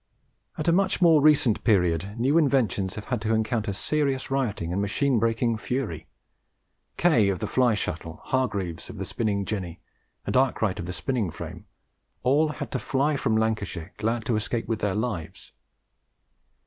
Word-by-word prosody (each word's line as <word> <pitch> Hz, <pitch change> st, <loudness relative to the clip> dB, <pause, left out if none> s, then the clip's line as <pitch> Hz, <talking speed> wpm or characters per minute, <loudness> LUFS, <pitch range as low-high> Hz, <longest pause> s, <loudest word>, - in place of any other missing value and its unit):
At 155 Hz, -, -3 dB
a -, -, +6 dB
much 190 Hz, +2 st, +2 dB
more 165 Hz, -4 st, +6 dB
recent 140 Hz, -7 st, +4 dB
period 95 Hz, -2 st, +2 dB
new 135 Hz, +7 st, +3 dB
inventions 115 Hz, -, +1 dB
have 105 Hz, -, -7 dB
had 125 Hz, -4 st, -2 dB
to 110 Hz, +1 st, +1 dB
encounter 110 Hz, -1 st, 0 dB
serious 135 Hz, +6 st, -1 dB
rioting 110 Hz, -11 st, -1 dB
and 100 Hz, -, 0 dB
machine 125 Hz, +5 st, +1 dB
breaking 115 Hz, +1 st, +1 dB
fury. 110 Hz, -, -3 dB, 0.9 s
Kay 125 Hz, -, +4 dB
of 95 Hz, -, 0 dB
the -, -, -3 dB
fly 125 Hz, -3 st, +2 dB
shuttle, 80 Hz, -4 st, -4 dB
Hargreaves 100 Hz, -10 st, -2 dB
of -, -, -8 dB
the -, -, -4 dB
spinning 100 Hz, -3 st, -1 dB
jenny, 95 Hz, -6 st, -4 dB, 0.5 s
and -, -, -2 dB
Arkwright 120 Hz, -6 st, +2 dB
of 85 Hz, -, -5 dB
the -, -, -3 dB
spinning 120 Hz, -3 st, -1 dB
frame, -, -, -8 dB, 0.6 s
all 145 Hz, +5 st, +4 dB
had -, -, -6 dB
to -, -, -1 dB
fly 145 Hz, +2 st, 0 dB
from 110 Hz, -5 st, +1 dB
Lancashire, 105 Hz, -6 st, -2 dB
glad 110 Hz, +2 st, -1 dB
to 120 Hz, -, +1 dB
escape 115 Hz, +2 st, -2 dB
with 115 Hz, -2 st, -1 dB
their 100 Hz, -3 st, 0 dB
lives. 105 Hz, -7 st, -4 dB
110 Hz, 165 wpm, -26 LUFS, 100-135 Hz, 0.9 s, a